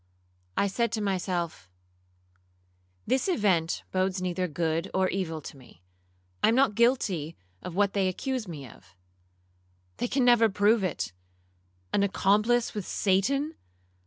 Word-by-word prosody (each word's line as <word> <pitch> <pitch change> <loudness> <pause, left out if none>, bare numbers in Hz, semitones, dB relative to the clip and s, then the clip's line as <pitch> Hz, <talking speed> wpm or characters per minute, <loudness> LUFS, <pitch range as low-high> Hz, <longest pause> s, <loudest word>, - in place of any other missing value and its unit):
I - - +3
said 230 +3 0
to 220 - 0
myself, 180 - -2 1.4
'This 260 - +1
event 190 - +1
bodes 185 0 0
neither 180 0 -1
good 165 +2 -1
or 190 0 +3
evil 165 -5 -3
to 145 - -9
me. 125 -10 -18 0.6
I - - +5
am 225 - +4
not 265 -3 +4
guilty 200 - +1 0.2
of 175 - -7
what 200 0 +2
they 195 -2 +1
accuse 250 +4 -3
me 145 -6 -7
of. 95 -4 -18 1.0
They - - -1
never 240 -2 +5
can 215 - 0
prove 205 +1 +3
it,—an 90 - -6
accomplice 210 +4 +2
with 205 -4 -5
Satan! 275 +11 +1
190 Hz, 130 wpm, -28 LUFS, 160-215 Hz, 1.4 s, I